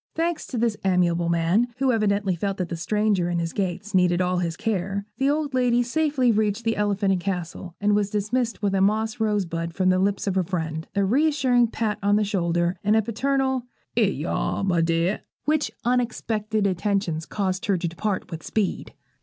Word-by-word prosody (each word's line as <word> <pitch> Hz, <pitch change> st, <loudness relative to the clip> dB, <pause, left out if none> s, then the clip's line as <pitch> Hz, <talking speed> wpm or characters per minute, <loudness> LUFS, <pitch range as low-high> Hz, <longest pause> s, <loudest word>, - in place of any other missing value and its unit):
Thanks 335 Hz, 0 st, -1 dB
to 250 Hz, -, -4 dB
this 230 Hz, -1 st, +1 dB
amiable 175 Hz, -2 st, +2 dB
man, 170 Hz, +8 st, +2 dB
who 265 Hz, 0 st, +2 dB
evidently 205 Hz, -4 st, +1 dB
felt 195 Hz, +3 st, -2 dB
that 180 Hz, -2 st, -3 dB
the 170 Hz, -, -3 dB
stranger 200 Hz, 0 st, +1 dB
in 175 Hz, -, -1 dB
his 165 Hz, -1 st, -2 dB
gates 200 Hz, +2 st, -3 dB
needed 180 Hz, -1 st, +3 dB
all 180 Hz, 0 st, +1 dB
his 170 Hz, -2 st, -2 dB
care, 200 Hz, -2 st, -2 dB
the 270 Hz, +1 st, +3 dB
old 295 Hz, -1 st, -1 dB
lady 245 Hz, -1 st, +3 dB
safely 270 Hz, -1 st, +1 dB
reached 215 Hz, 0 st, 0 dB
the 225 Hz, -1 st, +1 dB
Elephant 205 Hz, -1 st, +1 dB
and 180 Hz, -, -1 dB
Castle, 180 Hz, -2 st, -4 dB
and 205 Hz, 0 st, +2 dB
was 205 Hz, -1 st, +1 dB
dismissed 220 Hz, +3 st, -1 dB
with 200 Hz, -1 st, +1 dB
a 195 Hz, -, +2 dB
moss 220 Hz, +4 st, +1 dB
rose 210 Hz, -3 st, +1 dB
bud 165 Hz, 0 st, -4 dB
from 185 Hz, +1 st, +2 dB
the 185 Hz, 0 st, +3 dB
lips 200 Hz, +1 st, 0 dB
of 195 Hz, -, 0 dB
her 190 Hz, 0 st, +2 dB
friend, 160 Hz, -3 st, -3 dB
a 200 Hz, -1 st, +2 dB
reassuring 260 Hz, 0 st, +3 dB
pat 220 Hz, -2 st, -2 dB
on 205 Hz, +1 st, +3 dB
the 210 Hz, -, +3 dB
shoulder, 175 Hz, -3 st, 0 dB
and 210 Hz, +1 st, +3 dB
a 220 Hz, -, +3 dB
paternal 265 Hz, +2 st, 0 dB, 0.3 s
''Ere 220 Hz, -4 st, +3 dB
yer 150 Hz, +5 st, -3 dB
are, -, -, -1 dB
my 180 Hz, -4 st, +2 dB
dear,' 165 Hz, +4 st, +1 dB, 0.2 s
which 305 Hz, 0 st, +1 dB, 0.2 s
unexpected 225 Hz, -3 st, 0 dB
attentions 185 Hz, -4 st, -1 dB
caused 190 Hz, -2 st, -2 dB
her 195 Hz, -2 st, +2 dB
to 175 Hz, 0 st, -2 dB
depart 185 Hz, +4 st, -3 dB
with 165 Hz, -1 st, -5 dB
speed. 210 Hz, -4 st, -2 dB
200 Hz, 200 wpm, -24 LUFS, 180-225 Hz, 0.3 s, needed